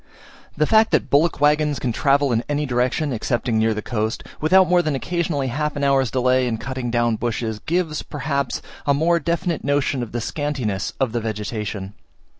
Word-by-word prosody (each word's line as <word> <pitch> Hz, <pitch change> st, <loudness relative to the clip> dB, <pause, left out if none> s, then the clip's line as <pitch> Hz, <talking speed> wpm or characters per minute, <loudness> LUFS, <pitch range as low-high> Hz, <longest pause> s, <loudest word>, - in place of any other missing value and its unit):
The 150 Hz, -, +3 dB
fact 220 Hz, +5 st, +4 dB
that -, -, +1 dB
bullock 155 Hz, +3 st, +3 dB
waggons 150 Hz, 0 st, +3 dB
can 120 Hz, 0 st, -1 dB
travel 140 Hz, +3 st, +2 dB
in 115 Hz, 0 st, +1 dB
any 150 Hz, 0 st, 0 dB
direction, 130 Hz, +3 st, 0 dB
excepting 120 Hz, 0 st, -1 dB
near 110 Hz, 0 st, +2 dB
the 110 Hz, -, -4 dB
coast, 110 Hz, -1 st, -2 dB, 0.2 s
without 185 Hz, +4 st, +5 dB
more 180 Hz, +1 st, +4 dB
than 155 Hz, -4 st, -1 dB
occasionally 155 Hz, -2 st, -1 dB
half 150 Hz, +4 st, -2 dB
an 145 Hz, -, -3 dB
hour's 135 Hz, -2 st, +3 dB
delay 130 Hz, +1 st, +2 dB
in 115 Hz, -2 st, -1 dB
cutting 130 Hz, 0 st, -4 dB
down 120 Hz, -1 st, +1 dB
bushes, 110 Hz, -2 st, -2 dB
gives, 165 Hz, 0 st, -1 dB
perhaps, 140 Hz, -2 st, -3 dB, 0.2 s
a 140 Hz, -, +4 dB
more 170 Hz, +4 st, +2 dB
definite 170 Hz, +1 st, -1 dB
notion 140 Hz, -2 st, 0 dB
of 120 Hz, -, -5 dB
the 120 Hz, -, -2 dB
scantiness 125 Hz, -7 st, -2 dB
of 130 Hz, -4 st, +1 dB
the 120 Hz, 0 st, -2 dB
vegetation. 105 Hz, -2 st, -4 dB
135 Hz, 185 wpm, -22 LUFS, 120-150 Hz, 0.2 s, without